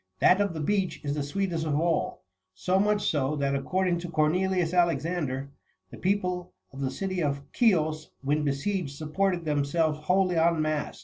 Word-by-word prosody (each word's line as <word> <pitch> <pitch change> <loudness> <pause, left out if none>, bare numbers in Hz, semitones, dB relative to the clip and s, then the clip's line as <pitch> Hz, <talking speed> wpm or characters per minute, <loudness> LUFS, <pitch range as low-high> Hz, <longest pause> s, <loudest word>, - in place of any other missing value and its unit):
That 190 - +5
of 200 -4 0
the - - -4
beech 190 +4 0
41 150 - -8
is - - -1
the 150 - -1
sweetest 185 -5 -1
of 150 -2 0
all; 170 -1 0 0.3
so 185 - +1
much 210 +1 +2
so, 145 -1 +1
that, 140 -1 0
according 180 +5 0
to 175 0 -6
Cornelius 175 +2 +1
Alexander, 165 -6 0 0.4
the - - -9
people 180 -2 -1 0.2
of 135 - -7
the 135 - 0
city 185 +5 -3
of 140 -2 -1
Chios, 155 -9 +2
when 150 +2 +1
besieged, 145 +2 -1
supported 175 +3 -1
themselves 150 +1 +1
wholly 180 +2 +2
on 165 0 +3
mast. 155 -1 -2
165 Hz, 175 wpm, -27 LUFS, 150-185 Hz, 0.4 s, That